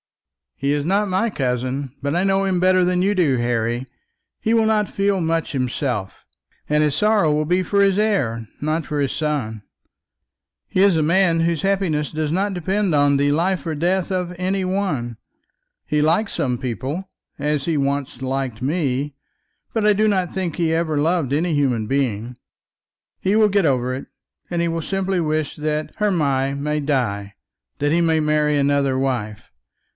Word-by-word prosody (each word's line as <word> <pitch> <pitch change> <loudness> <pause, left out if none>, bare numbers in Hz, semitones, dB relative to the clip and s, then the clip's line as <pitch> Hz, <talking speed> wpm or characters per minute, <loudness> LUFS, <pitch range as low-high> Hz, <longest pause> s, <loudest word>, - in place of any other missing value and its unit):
"He 140 +1 -1
is 145 -1 -1
not 200 +3 +1
my 190 +5 +1
cousin, 130 -1 -2
but 140 +2 -1
I 175 - +2
know 195 0 +2
him 185 -2 +1
better 185 0 +4
than 180 0 +1
you 200 +2 +2
do, 155 -9 +2
Harry. 120 +1 -1 0.5
He 225 - 0
will 225 -1 +3
not 215 -2 +2
feel 195 0 0
much 165 -1 -1
himself, 125 -6 -2 0.5
and 150 0 +3
his 150 -2 +1
sorrow 210 -3 +3
will 150 +1 +1
be 180 +4 +1
for 200 +3 +1
his 195 -1 +3
heir, 130 - 0
not 155 +2 -1
for 150 - -3
his 140 -2 0
son. 130 -9 -2 1.0
He 185 - +2
is 200 -3 +5
a 160 - +2
man 170 0 +3
whose 170 0 0
happiness 190 -7 0
does 155 -1 -2
not 195 +4 0
depend 190 +1 0
on 145 -1 +4
the 145 +1 +2
life 180 +5 0
or 165 - -2
death 180 +5 0
of 180 -1 -2
any 190 +1 -1
one. 185 - -2 0.7
He 150 - 0
likes 165 +8 +1
some 130 -7 -1
people, 135 +9 -4 0.3
as 150 -1 -1
he 165 -3 0
once 140 -2 -2
liked 130 -3 -3
me; 140 -1 -1 0.6
but 225 -2 0
I 210 - +6
do 215 +2 +2
not 190 -4 +1
think 185 -4 -2
that 175 - -2
he 160 -1 +2
ever 160 -2 0
loved 155 -2 +1
any 165 +3 +1
human 125 -6 +1
being. 125 -3 -1 0.8
He 195 +2 +1
will 215 -1 +5
get 200 -2 +2
over 130 -3 +1
it, 135 - -7 0.4
and 175 -1 -1
he 170 - +1
will 165 0 -2
simply 195 0 -1
wish 155 -2 -1
that 155 0 -2
Hermy 140 -10 +1
may 150 +1 -1
die, 115 -9 -1 0.5
that 145 +1 +1
he 170 +2 +3
may 160 -1 +3
marry 150 -1 +2
another 140 -1 +2
wife. 120 -6 -2
155 Hz, 180 wpm, -21 LUFS, 135-185 Hz, 1.0 s, I